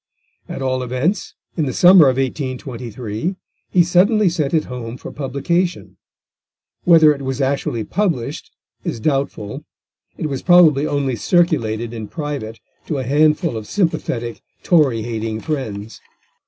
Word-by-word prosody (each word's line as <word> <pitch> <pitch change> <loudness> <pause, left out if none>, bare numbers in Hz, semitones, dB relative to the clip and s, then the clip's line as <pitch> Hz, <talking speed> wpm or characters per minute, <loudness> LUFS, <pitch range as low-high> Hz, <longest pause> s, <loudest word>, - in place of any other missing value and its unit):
At 135 - -5
all 130 -1 0
events, 130 - -2 0.2
in 155 -4 0
the 130 - -2
summer 180 -2 +7
of 130 - -1
1823 130 - -4 0.3
he 180 - +4
suddenly 190 +4 +3
sent 155 -5 -1
it 160 -2 +2
home 125 -1 -7
for - - -9
publication; 160 +6 -2 0.9
whether 160 -3 +7
it 140 - -9
was 135 0 -3
actually 135 -4 -1
published 170 - -2 0.3
is - - -3
doubtful, 135 -2 -2 0.5
it - - -4
was 135 -3 -3
probably 160 -5 +5
only 140 -3 -1
circulated 120 - +1
in 110 -2 -6
private 140 -8 -5 0.3
to 150 - -2
a 130 - -2
handful 150 +3 +2
of 110 -1 -6
sympathetic 125 - -2 0.2
Tory 140 -10 +3
hating 110 -1 -3
friends. 110 -8 -5
135 Hz, 135 wpm, -19 LUFS, 120-165 Hz, 0.9 s, summer